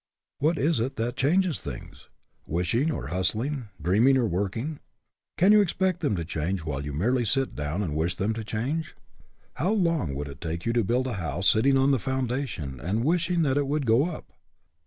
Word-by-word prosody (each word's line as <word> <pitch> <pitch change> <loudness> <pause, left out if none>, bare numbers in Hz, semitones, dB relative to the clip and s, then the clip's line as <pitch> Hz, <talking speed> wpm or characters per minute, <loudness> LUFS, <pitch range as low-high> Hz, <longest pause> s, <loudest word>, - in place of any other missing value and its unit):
What 160 +4 +2
is 155 -1 +2
it 125 +4 -2
that 115 +2 -2
changes 175 +4 +2
things? 70 -4 -9 0.4
Wishing, 90 - +1
or 155 - -3
hustling? 115 - -1
dreaming, 110 +10 +4
or 125 - +2
working? 105 - -2 0.6
Can 190 +4 +5
you 210 0 +7
expect 185 -1 0
them 145 -11 0
to 85 -2 -3
change 80 +2 -2
while 70 -3 -3
you 75 - -4
merely 120 - +1
sit 135 +4 0
down 75 +7 -2
and 75 -6 -3
wish 85 +3 0
them 100 +5 0
to 110 0 -5
change? 130 +9 -3 0.6
How 170 +8 +1
long 165 - +1
would 70 +1 -4
it 70 -1 -10
take 85 +1 -4
you 115 - +1
to 120 -1 +2
build 125 +6 +1
a 130 - -2
house 80 +4 -1
sitting 135 +5 +4
on 135 +1 +4
the 135 - +3
foundation 125 - -3
and 100 - -1
wishing 170 +1 +2
that 135 -2 +1
it 145 -1 +1
would 145 0 0
go 120 +7 +4
up? 160 - -9
120 Hz, 200 wpm, -26 LUFS, 90-145 Hz, 0.6 s, you